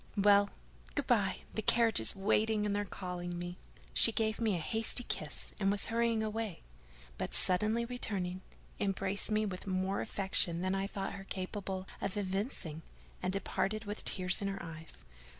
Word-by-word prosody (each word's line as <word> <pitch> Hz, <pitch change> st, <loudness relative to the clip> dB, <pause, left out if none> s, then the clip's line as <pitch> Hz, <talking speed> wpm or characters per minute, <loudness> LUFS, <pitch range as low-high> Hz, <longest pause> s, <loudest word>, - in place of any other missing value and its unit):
"Well, 200 Hz, 0 st, +5 dB, 0.5 s
good -, -, -1 dB
by, -, -, +1 dB
the -, -, -2 dB
carriage 230 Hz, +1 st, +4 dB
is 110 Hz, -, +4 dB
waiting, 210 Hz, +2 st, +1 dB
and 205 Hz, -1 st, 0 dB
they're 205 Hz, -, 0 dB
calling 175 Hz, -2 st, -5 dB
me." 175 Hz, +1 st, -6 dB, 0.3 s
She 230 Hz, -, +8 dB
gave 220 Hz, 0 st, -1 dB
me 220 Hz, -4 st, +2 dB
a -, -, -1 dB
hasty 225 Hz, +8 st, +4 dB
kiss, 150 Hz, -9 st, -3 dB
and 195 Hz, -1 st, +2 dB
was 200 Hz, 0 st, +1 dB
hurrying 230 Hz, -1 st, +1 dB
away; 215 Hz, -4 st, -4 dB, 0.6 s
but, -, -, -3 dB
suddenly 215 Hz, +6 st, +3 dB
returning, 195 Hz, -7 st, -2 dB, 0.4 s
embraced 195 Hz, 0 st, +1 dB
me 215 Hz, 0 st, +1 dB
with 190 Hz, -1 st, -6 dB
more 190 Hz, +1 st, -1 dB
affection 190 Hz, -5 st, +3 dB
than 185 Hz, +1 st, 0 dB
I 195 Hz, 0 st, -1 dB
thought 200 Hz, -1 st, -4 dB
her 195 Hz, -1 st, -8 dB
capable 190 Hz, 0 st, -5 dB
of 195 Hz, -, -3 dB
evincing, 190 Hz, -, -3 dB, 0.4 s
and 185 Hz, -, -1 dB
departed 195 Hz, +2 st, -2 dB
with 205 Hz, +1 st, -5 dB
tears 180 Hz, +1 st, +1 dB
in 200 Hz, -, -1 dB
her 195 Hz, 0 st, -3 dB
eyes. 160 Hz, -1 st, -9 dB
195 Hz, 170 wpm, -33 LUFS, 185-215 Hz, 0.6 s, She